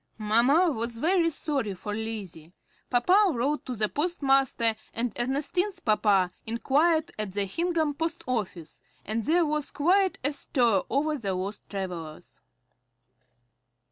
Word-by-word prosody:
Mamma 240 +11 +3
was 230 -2 -2
very 335 +5 +2
sorry 275 -10 -1
for 205 +3 -6
Lizzie. 205 -7 -6 0.4
Papa 365 +11 +4
wrote 280 +6 -1
to 250 - -3
the 215 -1 +1
postmaster, 270 - +1 0.2
and 230 -1 -1
Ernestine's 295 +10 -1
papa 205 -4 +2 0.2
inquired 300 +8 +1
at 210 -3 -2
the 200 0 0
Hingham 320 - 0
post 325 +3 -3
office, 200 -10 -4 0.2
and 220 +2 -2
there 335 +5 +3
was 300 -1 -1
quite 370 +6 +2
a 285 - +2
stir 245 - +1
over 300 +2 0
the 195 -5 -2
lost 195 +3 -5
travellers. 175 -6 -7
245 Hz, 130 wpm, -27 LUFS, 210-310 Hz, 0.4 s, Papa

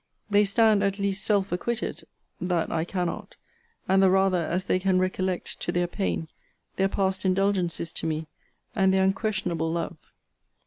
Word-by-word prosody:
They 205 0 +5
stand 215 0 +4
at 200 -1 0
least 200 0 -1
self 205 -2 +1
acquitted, 230 +7 -3 0.3
(that 175 -2 -1
I 160 -1 0
cannot;) 180 -2 -3 0.5
and 190 0 +4
the 190 - +6
rather, 190 -3 +2
as 185 +2 -1
they 185 - +1
can 185 0 +2
recollect, 185 0 -1
to - - -2
their 175 0 +1
pain, 85 - -2 0.5
their 195 0 +2
past 190 -1 0
indulgencies 185 -3 0
to - - -3
me, 160 0 -2 0.5
and 190 -3 +4
their 190 0 +3
unquestionable 190 -5 0
love. 170 0 -3
190 Hz, 160 wpm, -26 LUFS, 175-195 Hz, 0.5 s, the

